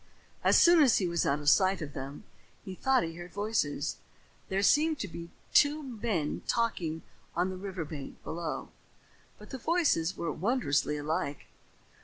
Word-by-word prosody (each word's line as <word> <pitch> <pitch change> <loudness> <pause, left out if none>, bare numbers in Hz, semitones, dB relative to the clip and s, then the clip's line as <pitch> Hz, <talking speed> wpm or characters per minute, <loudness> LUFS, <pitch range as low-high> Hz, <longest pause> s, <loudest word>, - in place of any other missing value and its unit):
As - - +5
soon 345 -1 +7
as 265 -6 +5
he 185 - +1
was 170 -1 0
out 140 +1 +1
of 145 - -8
sight 190 -1 +3
of 150 -4 -6
them, 135 +6 -7 0.4
he 190 - -6
thought 265 +3 +2
he 165 0 -4
heard 175 +1 -9
voices. 200 -8 -1 0.5
There 195 +1 0
seemed 310 +7 +4
to 205 - -3
be 170 -1 -8 0.2
two 295 +1 +4
men 220 - -2
talking 175 -9 -1 0.3
on 180 +3 +1
the - - -5
river 185 -3 -5
bank 145 -3 -8
below, 165 -1 -4 0.7
but - - -14
the 265 - -5
voices 265 - +1
were 170 - -2
wondrously 165 - 0
alike. 150 -1 -3
185 Hz, 165 wpm, -30 LUFS, 160-230 Hz, 0.7 s, soon